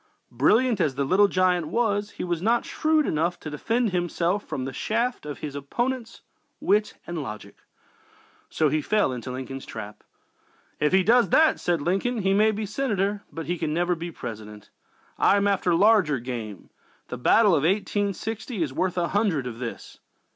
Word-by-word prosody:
Brilliant 215 - +3
as 145 -5 +1
"the 140 - 0
Little 195 +8 +4
Giant" 180 -4 +1
was, 205 +1 0
he - - -7
was 175 -2 -2
not 230 +4 +2
shrewd 310 -1 +1
enough 170 +3 -1
to 155 - -6
defend 225 - 0
himself 175 +2 -1
from 130 - -4
the 135 - -5
shafts 230 - -2
of 145 - -5
his 150 -2 -5
opponent's 235 - -3 0.4
wit 210 +1 +1
and 175 -2 -4
logic. 105 -6 -8 0.9
So 155 - +1
he 155 +2 0
fell 210 -6 +1
into 125 +1 -6
Lincoln's 130 +1 -6
trap. 105 0 -8 0.8
"If 150 - +2
he 190 0 +4
does 235 -1 +4
that," 315 - +4
said 170 -4 0
Lincoln, 200 +6 0
"he 195 0 +2
may 210 +2 +4
be 215 0 -2
Senator, 205 -3 -1
but 165 - -6
he 175 0 -3
can 150 - -1
never 175 +1 +1
be 170 0 -5
President. 105 -8 -9 0.5
I 200 - +4
am 200 0 +2
after 185 -3 +2
larger 195 -6 +4
game. 115 -5 -7 0.4
The 125 - -5
battle 205 - +5
of 150 - +3
1860 205 - -1
is 140 -4 -4
worth 185 +4 -1
a 170 -1 0
hundred 195 - +1
of 120 -2 -6
this." 120 -2 -7
180 Hz, 175 wpm, -25 LUFS, 145-210 Hz, 0.9 s, battle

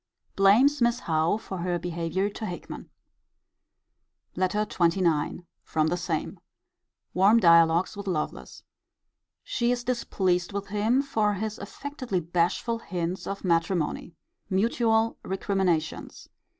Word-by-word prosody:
Blames 240 +9 +5
Miss 235 0 +2
Howe 160 +4 +1
for 195 -4 -7
her 175 0 -1
behaviour 175 +2 -2
to 215 +1 -5
Hickman. 175 -2 -8 1.5
LETTER 195 +3 0
XXIX. 170 -3 0 0.2
From 155 -1 0
the 175 - 0
same. 170 -3 -3 0.7
Warm 200 +5 +5
dialogues 170 -1 +4
with 200 0 -7
Lovelace. 155 -5 -4 0.8
She 235 0 0
is 245 -1 -1
displeased 190 -7 -1
with 200 -1 -4
him 220 +6 +1
for 215 -7 0
his 215 +2 -4
affectedly 255 - -4
bashful 175 +7 0
hints 180 -3 -4
of 195 0 -5
matrimony. 170 -1 0 0.3
Mutual 225 +2 +1
recriminations. 190 -4 -2
190 Hz, 110 wpm, -26 LUFS, 170-220 Hz, 1.5 s, Blames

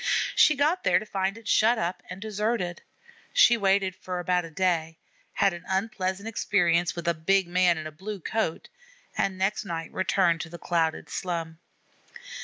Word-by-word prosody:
She 305 - +6
got 305 +6 +1
there 180 - +4
to 210 - -3
find 195 0 -2
it 225 -2 -12
shut 225 +3 +4
up 175 -2 -2
and 185 +2 -7
deserted. 210 -3 -2 0.5
She - - +6
waited 195 -3 +2
about 180 0 -1
for - - -7
a - - -12
day; 165 -2 0 0.4
had 195 -2 +2
an 175 0 -8
unpleasant 190 0 -2
experience 175 -6 +1
with 170 -1 -6
a 170 - +3
big 190 +4 +1
man 175 -1 +3
in 155 - -6
a 155 - -6
blue 195 +6 -7
coat, 185 -2 -2 0.5
and 190 -1 0
next 195 +3 0
night 165 -4 -5
returned 185 -3 +2
to 165 - -7
the 170 - -8
crowded 165 -2 -1
slum. 165 -3 -4
185 Hz, 175 wpm, -27 LUFS, 170-200 Hz, 0.5 s, She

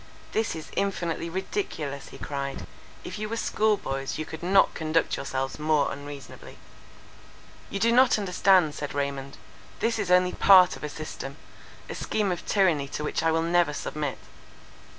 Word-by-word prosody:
"This 220 -5 0
is 160 - -8
infinitely 170 -4 -1
ridiculous," 165 - -4
he - - -11
cried, 140 -1 -4 0.4
"if - - -6
you 215 0 -3
were 230 - -3
school 215 -2 +2
boys, 135 -5 -4
you 155 - -3
could 160 0 -8
not 190 +3 +4
conduct 160 +1 0
yourselves 135 0 -3
more 150 -1 +2
unreasonably." 145 0 -9 1.1
"You 200 - -3
do 230 +3 +3
not 250 0 +5
understand," 185 -5 +3
said 145 -1 -5
Raymond. 140 -1 -3 0.4
"This 230 -1 0
is 200 -3 -2
only 180 0 +5
part 185 -2 +7
of - - -12
a 150 - -3
system:—a 150 -1 -9
scheme 210 -3 -1
of 175 - -3
tyranny 175 -9 +2
to 150 - -5
which 150 - -1
I 165 0 +2
will 165 0 +1
never 170 -2 +2
submit. 145 -3 -3
165 Hz, 160 wpm, -27 LUFS, 145-195 Hz, 1.1 s, part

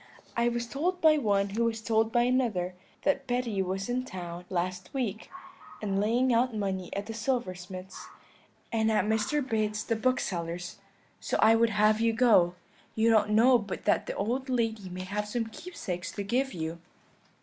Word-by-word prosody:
I 235 0 +2
was 240 0 -2
told 335 +9 -1
by 310 -2 +5
one 200 -5 +1
who 225 +4 0
was 225 -1 -1
told 220 0 +1
by 240 +1 +3
another, 235 -8 +1 0.3
that 275 -2 +1
Betty 245 -5 0
was 190 +1 -2
in 250 +1 -1
town 175 -5 -7
last 180 0 -3
week, 220 -5 -3 0.5
and 195 -2 -1
laying 240 +4 +2
out 240 0 +2
money 190 -3 -2
at 200 0 -3
the 225 - -6
silversmith's, 190 -6 -4 0.6
and 220 -1 +2
at 215 - +2
Mr. 220 +6 0
Bates 215 -2 0
the 230 - 0
bookseller's, 180 -7 -2 0.4
so - - -1
I 220 - +6
would 230 0 +4
have 215 +1 +3
you 230 0 +3
go: 215 -8 +4 0.4
you 225 +1 +3
don't 215 -1 +4
know 235 +4 +5
but 200 -3 -6
that - - +2
the - - -3
old 250 +6 -2
lady 225 -6 -1
may 185 +1 -6
have 205 +3 -3
some 230 +2 -1
keepsakes 215 - -6
to 205 - -4
give 255 +6 0
you.' 165 0 -4
220 Hz, 175 wpm, -29 LUFS, 195-240 Hz, 0.6 s, I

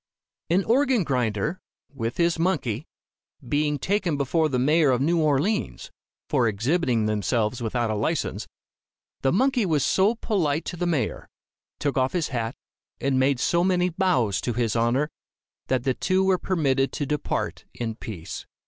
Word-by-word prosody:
An 185 +4 +3
organ 255 -1 +3
grinder, 125 - -1 0.3
with 115 -3 -3
his 170 -1 +2
monkey, 150 - -1 0.6
being 150 +2 +1
taken 180 0 0
before 155 +3 +1
the 130 - 0
mayor 150 +4 +3
of 125 -2 +2
New 165 +4 +2
Orleans, 165 - 0 0.4
for 130 -5 +2
exhibiting 120 - +1
themselves 110 +2 0
without 115 0 -1
a - - -1
license, 140 +10 -2 0.7
the 135 - +2
monkey 255 +3 +2
was 155 -7 +1
so 200 +5 +3
polite 165 -9 0
to - - -4
the 175 +1 -2
mayor, 145 -10 -1 0.5
took 140 -2 0
off 130 0 +1
his 175 -4 0
cap 115 -1 -3 0.4
and 135 -1 +1
made 130 -1 +2
so 170 +6 +2
many 180 -1 +2
bows 165 - +1
to 120 - -2
his 115 -1 0
honor, 120 +6 +1 0.6
that 130 -2 0
the 130 -1 +1
two 185 +7 +1
were 190 -1 +2
permitted 135 -7 +1
to 145 - -2
depart 150 +1 -2
in 115 -2 -3
peace. 105 -7 -7
145 Hz, 155 wpm, -25 LUFS, 120-175 Hz, 0.7 s, An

